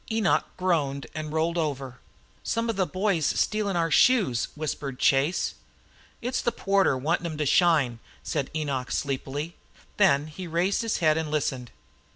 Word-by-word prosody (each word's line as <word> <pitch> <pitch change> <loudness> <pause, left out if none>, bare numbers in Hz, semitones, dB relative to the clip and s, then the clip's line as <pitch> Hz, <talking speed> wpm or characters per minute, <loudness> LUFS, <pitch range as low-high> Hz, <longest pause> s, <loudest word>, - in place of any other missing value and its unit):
Enoch 220 -4 +2
groaned 150 -7 0
and 155 -1 -5
rolled 165 +2 0
over. 135 -5 -3 0.4
"Some 230 +1 -1
of - - -7
the 190 -2 +1
boys 185 -3 0
stealing 210 +4 0
our 165 -1 +1
shoes," 195 - +4
whispered 145 -3 -4
Chase. 140 +8 +2 0.7
"It's 250 +2 -1
the 240 - +1
porter 195 - +2
wantin' 165 +6 0
'em 155 -2 -5
to 150 - 0
shine," 145 -7 +3 0.2
said 145 -4 -2
Enoch 140 -5 -2
sleepily. 140 +3 -3 0.4
Then 150 -8 +4
he 165 +4 -8
raised 175 +6 +1
his 230 -2 -1
head 155 0 +4
and 160 -1 -3
listened. 135 -5 -2
160 Hz, 155 wpm, -26 LUFS, 140-185 Hz, 0.7 s, shoes